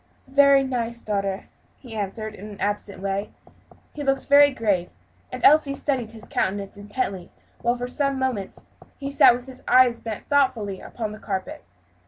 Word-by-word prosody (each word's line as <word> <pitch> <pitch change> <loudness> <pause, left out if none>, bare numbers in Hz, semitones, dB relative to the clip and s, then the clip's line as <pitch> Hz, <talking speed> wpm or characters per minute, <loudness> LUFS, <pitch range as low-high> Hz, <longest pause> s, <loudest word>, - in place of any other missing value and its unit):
"Very 275 0 +5
nice, 235 -3 -3
daughter," 195 -2 -2 0.3
he 245 -4 -12
answered, 215 +1 -4
in 210 +1 -10
an 205 - -11
absent 205 -1 -3
way. 195 +1 -2 0.6
He 295 - -5
looked 270 -1 0
very 285 0 +7
grave, 205 -8 -1 0.4
and - - -7
Elsie 290 -1 +5
studied 260 -6 -2
his 220 -1 -12
countenance 195 +1 -2
intently 205 -3 -4 0.3
while, 240 +1 +1
for 245 0 -4
some 275 +1 -1
moments, 255 -7 -3 0.3
he 275 0 -5
sat 260 -3 +6
with 245 0 -8
his 260 -1 -11
eyes 250 -2 +5
bent 220 -2 -6
thoughtfully 255 -9 +1
upon 220 -3 -5
the 215 - -9
carpet. 190 -3 -5
235 Hz, 165 wpm, -24 LUFS, 205-270 Hz, 0.6 s, very